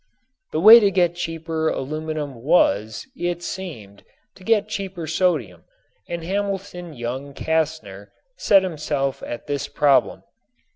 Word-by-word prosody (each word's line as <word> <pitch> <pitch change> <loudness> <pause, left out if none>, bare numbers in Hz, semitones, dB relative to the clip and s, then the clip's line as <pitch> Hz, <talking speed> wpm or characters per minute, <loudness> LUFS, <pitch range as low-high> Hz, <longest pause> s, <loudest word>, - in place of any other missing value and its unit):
The 155 - -1
way 220 +6 +10
to 205 -3 +3
get 175 -3 +2
cheaper 165 -2 -3
aluminum 155 +1 -4
was, 110 - +2
it 175 -5 -3
seemed, 120 - -7 0.3
to 190 - -17
get 215 0 +2
cheaper 195 -5 -5
sodium 155 - -1 0.4
and 170 -1 -4
Hamilton 190 -3 -4
Young 130 +4 -5
Castner 155 -12 -2 0.3
set 195 - +4
himself 150 -6 -2
at 120 - -7
this 145 -2 -3
problem. 140 -4 +2
160 Hz, 125 wpm, -22 LUFS, 140-185 Hz, 0.4 s, way